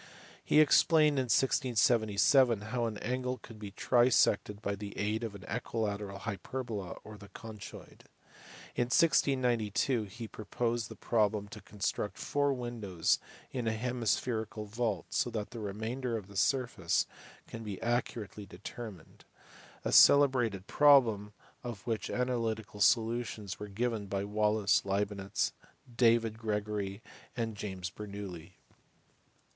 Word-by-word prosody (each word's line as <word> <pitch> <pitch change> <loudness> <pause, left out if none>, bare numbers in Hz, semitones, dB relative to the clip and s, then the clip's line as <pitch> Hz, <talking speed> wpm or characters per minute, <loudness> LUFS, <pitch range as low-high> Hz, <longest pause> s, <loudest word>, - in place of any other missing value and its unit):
He - - +4
explained 155 -1 +5
in 130 - 0
1677 120 -1 +3
how 120 -2 +1
an 110 -2 -4
angle 125 +3 -2
could 115 -3 -13
be 105 -1 -6
trisected 110 -2 +3
by 100 -2 -2
the 100 0 -7
aid 105 +3 -1
of 110 -3 -4
the 100 -2 -10
equilateral 105 -4 -3
hyperbola 105 0 -5
or 105 -1 -11
the 100 - -12
conchoid. 110 -3 -10 0.7
In 120 - +2
1692 125 - +2
he 115 +4 -8
proposed 115 +2 -2
the - - -9
problem 105 -2 +1
to 110 -1 -10
con 105 - -16
struct 100 0 -1
four 145 0 0
windows 115 -9 -1 0.3
in 125 -3 -3
a 110 - +1
hemispherical 110 -2 -1
vault 105 -4 -2
so - - +1
that 110 -3 -4
the 120 - -7
remainder 115 +4 -3
of 100 -3 -9
the 100 - -13
surface 125 +6 +1 0.4
can 115 - -8
be 105 -3 -5
accurately 115 -4 -2
determined: 95 0 -9 0.6
a - - 0
celebrated 125 -9 +6
problem 115 -7 +5 0.3
of 120 -4 -7
which 115 -2 -2
analytical 115 -4 -2
solutions 110 -3 +1
were 105 - -5
given 110 0 -2
by 100 0 -2
Wallis, 105 0 +2
Leibnitz, 100 0 -1 0.4
David 115 -2 +3
Gregory, 105 -1 -3 0.3
and 115 -2 -2
James 95 -3 -5
Bernoulli. 100 -5 -8
110 Hz, 130 wpm, -32 LUFS, 100-120 Hz, 0.7 s, celebrated